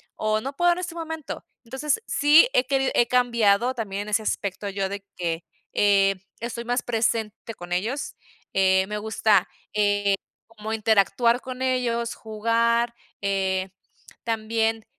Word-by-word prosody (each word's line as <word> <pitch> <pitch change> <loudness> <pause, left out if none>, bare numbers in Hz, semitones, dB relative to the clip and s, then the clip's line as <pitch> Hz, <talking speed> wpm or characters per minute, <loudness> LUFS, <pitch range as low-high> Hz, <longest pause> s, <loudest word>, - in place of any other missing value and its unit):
o: 215 0 0
"No 275 +4 -5
puedo 350 +2 +4
en 350 - -5
este 350 -2 -5
momento", 320 -2 -6 0.2
entonces 265 - -1
sí 300 +8 +6
he 250 - +3
querido 270 0 +1
he 240 - +3
cambiado 240 -1 +3
también 205 -4 -3
en 210 - -8
ese 210 +1 +2
aspecto 200 -1 -3
yo 195 -1 -2
de 200 0 -5 0.2
que, 170 -1 -2 0.3
eh, 195 -1 +4 0.2
estoy 235 0 -5
más 245 +1 0
presente 225 -1 -1
con 175 0 -10
ellos, 230 +10 -2 0.4
eh, 190 0 +3
me 210 - -3
gusta, 210 -2 +2 0.3
eh, 205 -1 +2 0.3
como 220 -1 -6
interactuar 225 +3 +3
con 255 0 -7
ellos, 240 -2 0
jugar, 230 +2 +1 0.3
eh, 190 -1 0 0.5
también 225 -1 -1
225 Hz, 145 wpm, -24 LUFS, 200-245 Hz, 0.5 s, sí